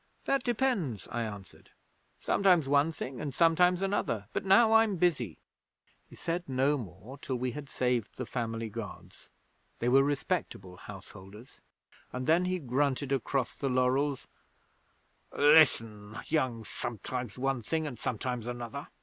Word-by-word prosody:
'"That 275 -2 +1
depends," 210 - -1
I 120 - -2
answered; 100 -4 -8 0.5
"sometimes 180 -7 +3
one 145 +3 +3
thing 130 -5 -6
and 145 -3 -4
sometimes 180 +2 +4
another. 190 - -1
But - - -1
now 220 +4 +6
I'm 225 -2 +5
busy." 150 - 0 0.7
'He - - -13
said 170 -1 -3
no 135 +3 +2
more 115 +2 -9
till 130 - -3
we 125 0 -2
had 145 +1 -8
saved 125 -4 -1
the 130 - -3
family 115 -2 -3
gods 110 -1 -9 0.5
(they 120 - -2
were 135 +2 +6
respectable 140 - -2
householders), 100 +3 -12 0.5
and 125 0 -4
then 165 +5 +3
he 185 0 0
grunted 140 -1 -1
across 135 -1 -1
the 135 - -2
laurels: 130 +2 +1 1.1
"Listen, 115 -9 +4
young 130 -7 0
sometimes 120 +1 -5
one 135 -1 0
thing 160 +8 -1
and 125 -6 -6
sometimes 125 0 -3
another. 120 +3 -5
130 Hz, 140 wpm, -30 LUFS, 115-160 Hz, 1.1 s, now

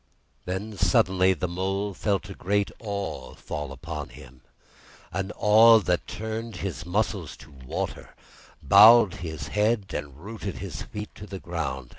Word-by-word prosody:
Then 95 +2 -5
suddenly 95 +3 +3
the 90 - -2
Mole 95 +3 -2
felt 100 +2 -1
a 100 - -7
great 100 +2 -1
Awe 100 -3 -5
fall 75 -2 -6
upon 75 +1 -6
him, 65 -1 -14 0.7
an 95 +3 -3
awe 110 +2 +7
that 90 -4 -1
turned 110 0 -5
his 90 -2 -5
muscles 100 -3 -2
to 75 - -15
water, 65 -2 -6 0.5
bowed 110 -3 +8
his 80 -4 -6
head, 105 0 +1
and 70 -2 -5
rooted 100 +2 -6
his 90 -5 -6
feet 105 0 -7
to 105 - -11
the 95 -1 -6
ground. 75 -8 -4
95 Hz, 145 wpm, -26 LUFS, 80-105 Hz, 0.7 s, bowed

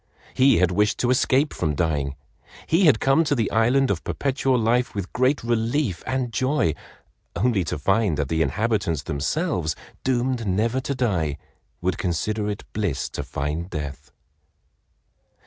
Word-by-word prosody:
He 135 +1 +5
had 90 0 +3
wished 105 +3 +2
to 125 - +2
escape 135 +3 +2
from 75 -4 -1
dying. 70 -3 -1 0.5
He 175 +4 +3
had 135 -9 +5
come 135 +4 +3
to 145 -2 +1
the 115 -5 +1
land 125 +5 +3
of - - -2
Perpetual 135 -1 0
Life 120 +2 +1
with 100 -3 -4
great 130 +2 +2
relief 115 - 0
and 130 -3 -1
joy, 130 - +1 0.6
only 105 -1 +1
to 75 - -3
find 95 +2 +1
that 70 - -1
the 80 +2 0
inhabitants 100 - 0
themselves, 80 - -1 0.3
doomed 125 -2 0
never 110 +7 +1
to 140 +1 -3
die, 90 - 0 0.4
would 90 -1 -1
consider 105 +4 -1
it 105 - -4
bliss 100 -10 -1
to - - -5
find 75 +5 -3
death. 75 -3 -6
110 Hz, 150 wpm, -24 LUFS, 85-130 Hz, 0.6 s, He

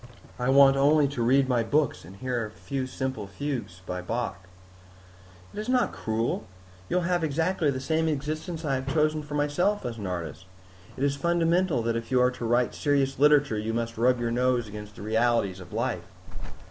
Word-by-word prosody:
I 125 +1 0
want 135 0 +6
only 145 +1 +4
to 135 -4 -4
read 130 +3 +4
my 125 -2 +2
books 145 +4 0
and 90 +4 -12
hear 120 +2 -2
a 110 - -5
few 130 +4 -4
simple 130 -4 -4
fugues 120 -6 -5
by 90 0 -4
Bach." 95 -1 -4 1.1
"It - - -6
is 215 +3 -4
not 250 -3 +2
cruel. 110 -1 -2 0.4
You - - -1
will 180 - +1
have 175 -1 0
exactly 160 +1 +1
the 130 -2 -1
same 160 +4 0
existence 155 +3 -3
I 140 - 0
have 130 +1 -2
chosen 155 0 +2
for 150 0 -7
myself 150 +8 +1
as 115 -2 -4
an 100 - -4
artist. 85 -1 -5 0.5
It 135 - -2
is 140 0 +2
fundamental 170 -2 +1
that 115 0 0
if 115 0 -4
you 130 -1 +3
are 125 0 +4
to 125 -1 -6
write 120 +1 +2
serious 140 -2 0
literature, 145 -6 +4
you 110 +1 -2
must 115 0 -2
rub 125 +2 +2
your 120 -1 -1
nose 125 -1 +1
against 105 0 -9
the - - -9
realities 110 -3 +1
of 90 -1 -12
life." - - -2
130 Hz, 200 wpm, -27 LUFS, 115-150 Hz, 1.1 s, want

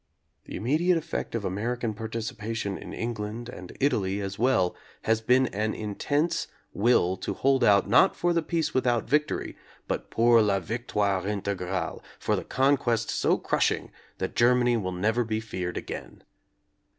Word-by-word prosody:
The - - -8
im 95 - -6
mediate 165 +8 +3
effect 155 - -4
of 110 -3 -2
American 115 +4 -2
participation 110 -1 -4
in - - -8
Eng 120 +1 -3
land 110 +3 -5
and 90 -5 -10
Italy 100 -8 +1
as 100 0 -5
well 115 -8 +2 0.3
has 110 0 +2
been 125 +3 +4
an 110 +2 -2
intense 145 - -1 0.3
will 100 -4 +3
to - - -4
hold 135 0 +2
out 100 -1 +5
not 125 - +5
for 175 0 +1
the 170 - +2
"peace 165 0 -1
without 120 -3 +1
victory" 150 +4 0 0.3
but - - -3
pour 115 0 +5
la 100 -2 +2
victoire 100 -1 -1
integrate, 95 -2 -2 0.2
for - - 0
the - - -3
conquest 130 -3 +1
so - - +2
crushing - - 0 0.3
that 95 - -4
Germany 120 0 +4
will 95 -5 -2
never 110 +7 +1
be 110 -1 -2
feared 95 -5 -4
again. - - -7
110 Hz, 160 wpm, -27 LUFS, 100-125 Hz, 0.3 s, out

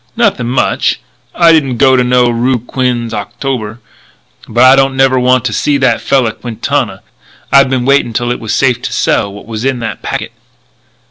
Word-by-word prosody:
"Nothing 205 - +1
much. 125 +2 0 0.4
I 170 -1 +5
didn't 140 -6 +1
go 130 0 +4
to 125 - +2
no 125 0 +2
roo 120 +2 0
Quinze 120 -1 -3
Octobre. 110 +1 -4 0.7
But 120 +3 +2
I 130 +1 +7
don't 135 0 +1
never 135 -1 +3
want 125 0 +2
to 110 - -1
see 145 +6 0
that 130 -4 +1
fella 130 -5 +1
Quintana. 120 -3 -3 0.5
I've 140 -1 +5
been 130 -2 -1
waiting 140 -3 +2
till 120 +1 -2
it's 110 -3 -4
safe 125 -3 +1
to - - -5
sell 100 - 0
what 100 - -11
was 110 0 -6
in 135 -1 0
that 115 - -5
packet." - - -4
125 Hz, 180 wpm, -12 LUFS, 120-135 Hz, 0.7 s, I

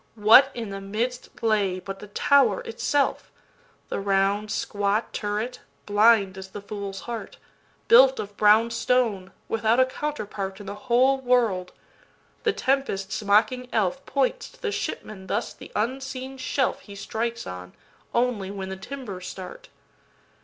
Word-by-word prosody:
What 225 +5 +7
in 230 -3 -4
the 195 0 -6
midst 230 +6 -3
lay 205 -4 +1
but 195 +1 -7
the 210 - -10
Tower 280 - +3
itself? 375 - -1 0.6
The - - -2
round 200 +1 +1
squat 205 +1 -1
turret, 210 +4 -3 0.3
blind 205 -2 +4
as 190 - -8
the 200 +2 -9
fool's 200 -2 -6
heart, 235 -2 -6 0.5
Built 260 +3 +7
of 205 0 -6
brown 215 +3 +5
stone, 230 -5 0 0.2
without 225 +2 +2
a 260 - +6
counter 295 -1 -4
partIn 195 0 -6
the 200 - -5
whole 255 +4 +2
world. 230 -8 +1 0.7
The 445 - +2
tempest's 255 - -1
mocking 215 +5 +2
elfPoints 270 - -1
to - - -21
the 430 - 0
shipman 190 - -5
thus 210 +5 -2
the - - -13
unseen 265 +3 -3
shelfHe 255 -6 -2
strikes 230 +3 -3
on, 90 0 -8 0.4
only 235 -6 0
when 195 -1 -5
the 190 - -5
timbers 200 -4 -7
start. 185 -1 -9
215 Hz, 140 wpm, -25 LUFS, 195-255 Hz, 0.7 s, What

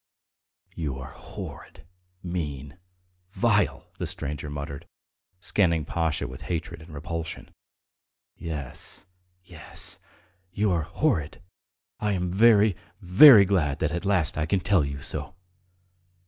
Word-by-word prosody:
"You 75 -5 -3
are 65 - -8
horrid, - - -10 0.4
mean, 75 -4 -5 0.5
vile.. 105 -4 +1
." - - -31
the - - -2
stranger 75 +1 -4
muttered, 70 +2 -6 0.5
scanning 85 -7 +2
Pasha 80 -3 -1
with 65 +1 -9
hatred 85 -2 -3
and 80 +1 -13
repulsion. 80 +2 -6 0.8
"Yes, 75 +3 -6 0.4
yes... 85 -4 -8 0.5
you 105 +2 +1
are 85 -2 +1
horrid. 90 - -1 0.6
I 105 -1 0
am 90 -2 -1
very, 105 -1 +5 0.2
very 100 +4 +9
glad 85 -8 +1
that - - -1
at 85 +1 -3
last 90 -7 +1
I 75 - 0
can 95 +2 +1
tell 95 -2 +3
you 70 0 -5
so!" - - -4
85 Hz, 120 wpm, -26 LUFS, 75-100 Hz, 0.8 s, very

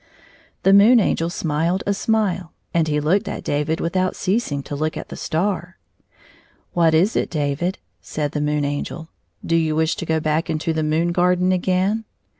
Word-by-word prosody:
The 195 - +5
Moon 220 +5 +7
Angel 170 -5 +1
smiled 165 +2 -1
a 200 - +1
smile, 195 -5 -1 0.2
and 165 -2 +2
he 150 -1 +1
looked 185 +8 +1
at - - -5
David 150 +3 -1
without 185 +2 0
ceasing 185 - -1
to 145 - -6
look 155 +2 -2
at - - -7
the - - -7
star. 180 +1 -2 1.0
"What 165 -2 +3
is 185 +8 +3
it, - - 0
David?" 150 +3 -1 0.2
said 150 -2 -3
the 150 - -2
Moon 150 0 0
Angel; 145 +3 -4 0.2
" - - -18
do 165 - +1
you 160 -2 +1
wish 160 +1 +1
to 170 - -5
go 160 0 +1
back 155 +1 0
to 160 +1 -1
the 160 - -1
moon 160 +3 +1
garden 180 +1 +2
again 185 +4 +1
165 Hz, 185 wpm, -21 LUFS, 155-185 Hz, 1.0 s, Moon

